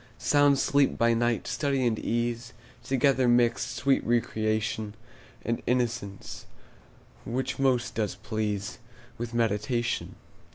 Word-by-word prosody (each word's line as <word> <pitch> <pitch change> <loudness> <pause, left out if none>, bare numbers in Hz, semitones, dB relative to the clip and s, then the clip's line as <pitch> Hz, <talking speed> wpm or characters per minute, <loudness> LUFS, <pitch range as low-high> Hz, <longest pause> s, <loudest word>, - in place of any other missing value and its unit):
Sound 145 -1 +4
sleep 140 +1 +2
by 115 0 +3
night; 120 0 +1
study 140 -3 0
and 110 -2 +1
ease 120 +1 -2 0.3
Together 135 -1 +2
mixed; 120 -1 +2
sweet 135 0 +2
recreation, 110 -2 0 0.5
And 115 +1 -1
innocence, 120 -5 -2 0.8
which 130 +3 -3
most 130 -3 +2
does 105 -5 -1
please 105 -1 -3 0.4
With 120 0 -4
meditation. 120 +2 0
120 Hz, 110 wpm, -28 LUFS, 110-125 Hz, 0.8 s, Sound